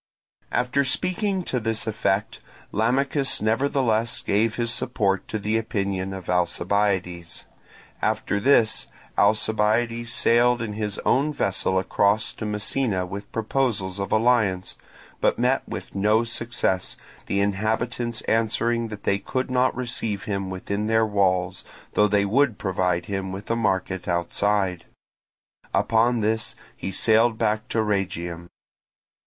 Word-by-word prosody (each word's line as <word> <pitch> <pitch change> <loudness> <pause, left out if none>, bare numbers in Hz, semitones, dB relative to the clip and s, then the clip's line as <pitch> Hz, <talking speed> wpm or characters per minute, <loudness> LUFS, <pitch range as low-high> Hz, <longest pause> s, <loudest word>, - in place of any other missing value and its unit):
After 125 +3 +1
speaking 185 - 0
to 130 - -2
this 110 -1 -2
effect, 105 -2 -1 0.3
Lamachus 135 +5 +1
nevertheless 115 0 +1
gave 110 +2 +1
his 115 -1 0
support 100 -6 0
to - - -3
the 110 +2 0
opinion 100 -4 -2
of 95 -1 -7
Alcibiades. 90 0 0 0.6
After 100 - 0
this 115 -2 +3 0.3
Alcibiades 110 +3 +2
sailed 120 +1 +3
in 110 -2 -3
his 105 -1 -3
own 140 +4 +3
vessel 95 -7 0
across 100 +3 +1
to 110 - -5
Messina 105 -1 -1
with 100 +3 -7
proposals 110 -5 -1
of 100 - -3
alliance, 110 -5 +2 0.4
but - - +2
met - - +1
with - - -6
no 105 +3 +3
success, 115 -5 -1 0.3
the 100 - 0
inhabitants 110 +4 -1
answering 115 +1 +1
that 105 -2 -8
they 100 - +1
could 130 +5 -3
not 130 0 +2
receive 115 -5 -2
him 100 -2 -3
within 100 +3 -3
their 110 0 +3
walls, 95 -4 +1 0.3
though 105 - +4
they 100 -1 +2
would 120 +2 +2
provide 90 -2 0
him 95 -1 -3
with 100 +4 -6
a - - +2
market 95 -4 -1
outside. 90 +1 0 0.9
Upon 115 +1 +2
this 110 +1 -1 0.2
he 95 - -5
sailed 110 +4 +3
back 110 -1 0
to 110 - 0
Rhegium. 90 -4 -2
105 Hz, 130 wpm, -24 LUFS, 95-115 Hz, 0.9 s, though